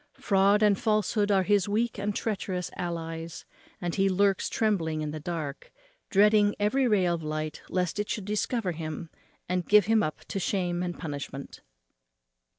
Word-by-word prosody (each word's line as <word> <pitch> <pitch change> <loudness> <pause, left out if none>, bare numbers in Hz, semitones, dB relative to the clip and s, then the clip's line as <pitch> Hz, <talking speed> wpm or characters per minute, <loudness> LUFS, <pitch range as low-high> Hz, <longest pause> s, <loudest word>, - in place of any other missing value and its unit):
Fraud 200 +1 +3
and 205 -2 +4
falsehood 210 -1 +1
are 195 -2 +4
his 205 0 +2
weak 220 +1 0
and 205 0 -2
treacherous 190 -4 -2
allies; 165 -1 -5 0.3
and 175 -1 -3
he 195 0 +2
lurks 195 0 +2
trembling 165 -8 0
in 150 - -3
the 155 - -5
dark, 155 -3 -5 0.4
dreading 210 0 +4
every 255 +6 +2
ray 205 -5 +3
of 170 -1 0
light, 155 0 -4
lest 180 +1 -1
it 210 - -2
should 210 - -3
discover 210 0 -1
him, 160 0 -6 0.4
and 180 -1 -2
give 210 -1 +7
him 220 0 +3
up 155 -6 -3
to 195 - -4
shame 180 -2 -1
and 175 -1 -3
punishment. 140 -3 -6
190 Hz, 160 wpm, -28 LUFS, 165-210 Hz, 0.4 s, give